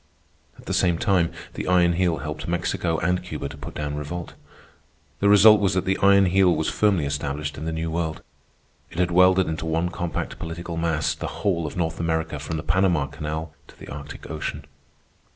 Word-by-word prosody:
At -, -, -16 dB
the -, -, -3 dB
same 90 Hz, -2 st, +2 dB
time, 90 Hz, -2 st, +2 dB, 0.2 s
the -, -, -5 dB
Iron 90 Hz, -1 st, +4 dB
Heel 85 Hz, -2 st, +1 dB
helped 75 Hz, +2 st, -6 dB
Mexico 85 Hz, -1 st, -1 dB
and 90 Hz, 0 st, +1 dB
Cuba 75 Hz, -5 st, -5 dB
to 75 Hz, -, -9 dB
put 70 Hz, -, -9 dB
down 75 Hz, -1 st, -3 dB
revolt. 75 Hz, +4 st, -5 dB, 0.9 s
The 100 Hz, -, +3 dB
result 105 Hz, +1 st, +8 dB
was 95 Hz, -2 st, +2 dB
that 95 Hz, 0 st, 0 dB
the 95 Hz, -, +1 dB
Iron 100 Hz, 0 st, +6 dB
Heel 95 Hz, -1 st, +4 dB
was 80 Hz, 0 st, -1 dB
firmly 100 Hz, -8 st, +2 dB
established 75 Hz, +1 st, -3 dB
in 75 Hz, -, -6 dB
the 80 Hz, -, -2 dB
New 80 Hz, 0 st, -3 dB
World. 80 Hz, -1 st, -3 dB, 0.7 s
It -, -, -12 dB
had 90 Hz, -1 st, +1 dB
welded 90 Hz, +1 st, +5 dB
into 80 Hz, 0 st, -3 dB
one 80 Hz, +2 st, 0 dB
compact 85 Hz, -2 st, -4 dB
political 85 Hz, +1 st, -5 dB
mass 80 Hz, -2 st, 0 dB
the -, -, -5 dB, 0.2 s
whole 85 Hz, -5 st, +1 dB
of 75 Hz, -, -7 dB
North 80 Hz, -2 st, -1 dB
America 80 Hz, -2 st, -1 dB
from 80 Hz, +2 st, -4 dB
the 75 Hz, -, -5 dB
Panama 85 Hz, -2 st, +2 dB
Canal 75 Hz, +1 st, -5 dB
to -, -, -17 dB
the -, -, -11 dB
Arctic 70 Hz, +1 st, -8 dB
Ocean. 75 Hz, -1 st, -5 dB
80 Hz, 195 wpm, -24 LUFS, 75-90 Hz, 0.9 s, result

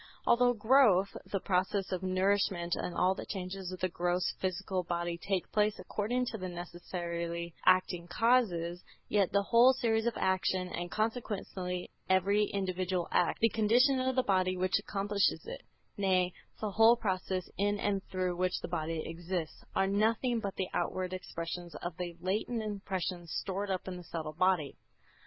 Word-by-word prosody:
Although 245 Hz, +1 st, +5 dB
growth, 215 Hz, -4 st, +4 dB, 0.2 s
the 195 Hz, -, 0 dB
process 190 Hz, +1 st, 0 dB
of 185 Hz, -1 st, -1 dB
nourishment 185 Hz, -2 st, +1 dB
and 180 Hz, -, -4 dB
all 185 Hz, +1 st, +3 dB
the -, -, -8 dB
changes 190 Hz, -1 st, -5 dB
of 185 Hz, -, -7 dB
the 185 Hz, -, +2 dB
gross 175 Hz, 0 st, 0 dB
physical 185 Hz, 0 st, -1 dB
body 170 Hz, 0 st, -2 dB
take 185 Hz, +1 st, -2 dB
place 210 Hz, 0 st, +2 dB
according 245 Hz, +5 st, -1 dB
to 220 Hz, -, -5 dB
the 185 Hz, 0 st, -4 dB
necessarily 170 Hz, -1 st, -5 dB
acting 185 Hz, -2 st, +3 dB
causes, 180 Hz, -5 st, +2 dB, 0.3 s
yet 200 Hz, -3 st, +2 dB
the 200 Hz, 0 st, +3 dB
whole 240 Hz, +5 st, +6 dB
series 225 Hz, -2 st, +1 dB
of 235 Hz, -, -1 dB
actions, 185 Hz, -1 st, 0 dB
and 175 Hz, 0 st, -3 dB
consequently 200 Hz, -5 st, -3 dB, 0.2 s
every 200 Hz, +3 st, +3 dB
individual 185 Hz, -3 st, -2 dB
act, -, -, +1 dB
the 230 Hz, -, +5 dB
condition 240 Hz, +5 st, +4 dB
of 260 Hz, 0 st, 0 dB
the 255 Hz, -, +3 dB
body 185 Hz, -3 st, +2 dB
which 185 Hz, 0 st, +2 dB
accomplishes 200 Hz, 0 st, 0 dB
it, -, -, -7 dB, 0.4 s
nay, 185 Hz, -2 st, +2 dB, 0.3 s
the 215 Hz, -2 st, -2 dB
whole 225 Hz, +3 st, +6 dB
process 185 Hz, -4 st, -2 dB
in 205 Hz, +1 st, +2 dB
and 200 Hz, -1 st, -1 dB
through 185 Hz, -1 st, -2 dB
which 180 Hz, +1 st, 0 dB
the -, -, -4 dB
body 165 Hz, -2 st, -2 dB
exists, 170 Hz, 0 st, -4 dB
are 195 Hz, -, +3 dB
nothing 225 Hz, +5 st, +1 dB
but 200 Hz, -3 st, -4 dB
the 190 Hz, -, -2 dB
outward 185 Hz, +1 st, -1 dB
expressions 170 Hz, -1 st, -5 dB
of 175 Hz, -1 st, -4 dB
the 175 Hz, -2 st, -5 dB
latent 215 Hz, +5 st, -1 dB
impressions 190 Hz, -5 st, -4 dB
stored 200 Hz, +1 st, -2 dB
up 190 Hz, -1 st, -2 dB
in 185 Hz, -1 st, -4 dB
the 180 Hz, -, -9 dB
subtle 160 Hz, -2 st, -5 dB
body. 175 Hz, -4 st, +1 dB
185 Hz, 165 wpm, -32 LUFS, 180-205 Hz, 0.4 s, whole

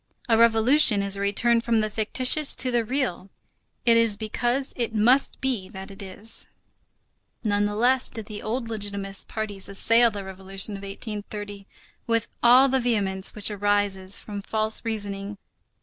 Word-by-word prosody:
A 230 Hz, -, +3 dB
revolution 230 Hz, 0 st, +4 dB
is 200 Hz, 0 st, +3 dB
a 200 Hz, -, -6 dB
return 230 Hz, +4 st, +2 dB
from 230 Hz, -1 st, +1 dB
the 215 Hz, -, -1 dB
fictitious 250 Hz, +7 st, +3 dB
to 255 Hz, 0 st, 0 dB
the 240 Hz, -1 st, +1 dB
real. 230 Hz, -6 st, -3 dB, 0.6 s
It 230 Hz, -1 st, +5 dB
is 230 Hz, -3 st, +2 dB
because 240 Hz, +5 st, -2 dB
it 235 Hz, -2 st, -3 dB
must 245 Hz, +6 st, +3 dB
be 245 Hz, -8 st, -2 dB
that 190 Hz, 0 st, -10 dB
it 195 Hz, -, -10 dB
is. 200 Hz, +3 st, -2 dB, 1.0 s
Nonetheless 215 Hz, +5 st, +1 dB
did 225 Hz, -2 st, -5 dB
the 210 Hz, -1 st, -8 dB
old 230 Hz, +2 st, -4 dB
legitimist 200 Hz, -3 st, -4 dB
parties 205 Hz, -3 st, -5 dB
assail 230 Hz, +4 st, +3 dB
the 205 Hz, -2 st, -7 dB
Revolution 195 Hz, +2 st, -5 dB
of 195 Hz, -, -9 dB
1830 205 Hz, 0 st, -8 dB, 0.4 s
with 230 Hz, -1 st, 0 dB
all 250 Hz, +3 st, +6 dB
the 265 Hz, 0 st, +1 dB
vehemence 200 Hz, -6 st, +1 dB
which 210 Hz, 0 st, +2 dB
arises 205 Hz, -2 st, +1 dB
from 205 Hz, -1 st, -7 dB
false 215 Hz, +1 st, 0 dB
reasoning. 205 Hz, -2 st, -4 dB
215 Hz, 150 wpm, -24 LUFS, 200-235 Hz, 1.0 s, all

